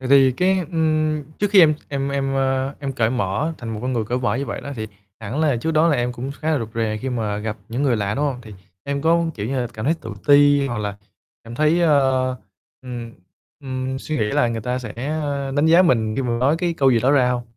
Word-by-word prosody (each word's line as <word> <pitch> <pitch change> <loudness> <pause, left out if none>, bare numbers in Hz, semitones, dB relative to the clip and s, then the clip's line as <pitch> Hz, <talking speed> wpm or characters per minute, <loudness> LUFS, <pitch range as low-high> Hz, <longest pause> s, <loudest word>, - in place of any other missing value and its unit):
Vậy 130 - -5
thì 135 -1 +6
cái, 185 +6 +2
ưm, 155 -2 +1 0.2
trước 205 -1 0
khi 200 -2 +7
em 155 -3 +6
em 140 -1 -2
em, 135 -1 -1
ơ, 135 0 0
em 140 -1 -3
cởi 115 -3 +1
mở 125 +6 -1
thành 120 - -7
một 110 -1 -4
con 130 +1 -1
người 115 -3 -1
cởi 120 +4 -1
vở 125 - 0
như 140 +1 -3
vậy - - -4
đó 140 - -7
thì 110 -1 -4 0.3
hẳn 115 +7 -3
là 150 -5 +2
trước 160 +8 -2
đó 160 +1 +3
là 150 - +2
em 120 0 -1
cũng 125 +2 -5
khá 160 0 -1
là 155 - +2
rụt 115 -3 -4
rè 110 -2 -1
khi 130 - -3
mà 110 -5 -2
gặp 110 +1 -4
những 120 +4 -2
người 130 -5 +2
lạ, 105 0 -1
đúng 145 - 0
hông? 140 -4 -1
Thì 110 -3 -11 0.3
em 140 0 -3
có, 170 +1 +3
kiểu 105 -1 -4
như 130 +2 -1
là, 120 - -1
cảm 110 - -5
thấy 155 +5 +2
tự 115 - -7 0.2
ti 145 -1 +5
hoặc 120 -4 -3
là 105 -1 -3 0.5
cảm 115 +1 -9
thấy, 155 +6 +2
a, 170 - +4 0.9
ừm, 120 -2 -7 0.5
ừm, 130 -1 -4
suy 155 +3 -4
nghĩ 110 - +1
là 120 - +2
người 115 -1 -3
ta 125 +3 -2
sẽ 115 -4 -7 0.6
đánh 145 +2 +3
giá 170 +3 +6
mình 110 -10 +2
khi 135 - 0
mà 120 -2 -1
nói 140 +5 +2
cái 175 -1 -1
câu 135 -4 +3
gì 120 -2 +3
đó 130 +4 +3
ra 130 -3 +4
hông? 125 -1 -1
130 Hz, 265 wpm, -21 LUFS, 115-145 Hz, 0.9 s, khi